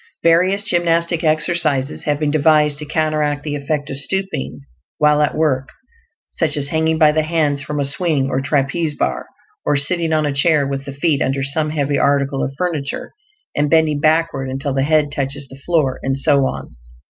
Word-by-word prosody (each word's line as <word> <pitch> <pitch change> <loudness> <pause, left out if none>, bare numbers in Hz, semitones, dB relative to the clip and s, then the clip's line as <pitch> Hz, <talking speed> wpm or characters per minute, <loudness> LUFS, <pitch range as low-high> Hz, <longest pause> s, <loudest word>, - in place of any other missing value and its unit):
Various 185 +4 +3
gymnastic 170 -2 +1
exercises 155 -3 0
have 145 -1 0
been 150 -1 0
devised 150 -1 +3
to 150 - -6
counteract 150 -1 -1
the 150 -1 -3
effect 145 0 -3
of 135 - -1
stooping 140 - -1 0.4
while 150 0 +3
at 150 - 0
work; 140 -4 0 0.6
such - - -1
as 140 -1 -2
hanging 160 +1 +1
by 155 -2 +5
the 155 +1 +1
hands 155 -3 0
from 150 0 -4
a 140 - 0
swing 150 -1 0
or 135 0 -1
trapeze 145 +3 -1
bar, - - -2 0.4
or - - +1
sitting 165 +3 +1
on 155 -1 +1
a 145 - -1
chair 145 0 +2
with 135 0 -4
the 140 - -6
feet 140 0 0
under 135 0 0
some 150 +3 0
heavy 145 -2 -1
article 140 -1 +1
of 135 - -4
furniture 160 -6 -3 0.4
and 145 0 +1
bending 155 -2 +3
backward 155 -3 +1
until 135 +1 -3
the 135 - 0
head 150 0 +2
touches 140 0 -3
the 135 - -13
floor, 155 -7 +1
and 135 0 -1
so 140 -1 +2
on. - - -7
150 Hz, 185 wpm, -18 LUFS, 140-160 Hz, 0.6 s, by